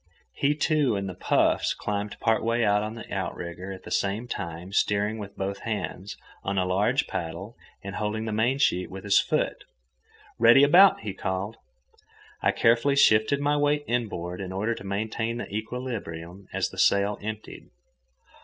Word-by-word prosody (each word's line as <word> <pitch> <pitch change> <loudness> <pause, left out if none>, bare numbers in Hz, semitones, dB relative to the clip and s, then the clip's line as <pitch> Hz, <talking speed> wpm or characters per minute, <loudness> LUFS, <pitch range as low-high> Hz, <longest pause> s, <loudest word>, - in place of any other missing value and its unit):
He, 145 +2 +1
too, 150 -5 +2
in 100 0 -2
the 95 - -5
puffs, 90 - +1
climbed 105 0 -4
part 110 -1 +1
way 115 +1 +1
out 105 0 +3
on 110 +1 -4
the 115 - -9
outrigger, 90 +3 -4
at 95 - -9
the - - -10
same 100 +5 -1
time 85 -2 -6
steering 105 +2 +1
with 100 -1 -8
both 100 +1 -3
hands 105 -3 -4 0.3
on 100 0 -2
a 95 - +2
large 105 +9 +1
paddle 85 +7 -5 0.3
and 100 -1 -6
holding 110 +1 -2
the 110 - -3
mainsheet 115 -3 +1
with 95 0 -8
his 100 -1 +4
foot. - - -1 0.8
"Ready 135 - +7
about!" 180 +7 +7
he 105 -3 -4
called. 95 +5 -3 0.8
I - - +3
carefully 120 +5 +3
shifted 140 +2 +4
my 145 +1 +2
weight 145 0 +1
inboard 100 -7 -2
in 95 -1 -5
order 105 +5 -1
to 105 - -9
maintain 110 +4 -2
the 110 -4 -6
equilibrium 100 -7 -5
as - - -1
the - - -9
sail 100 +1 +3
emptied. 110 +1 -7
105 Hz, 165 wpm, -26 LUFS, 95-120 Hz, 0.8 s, Ready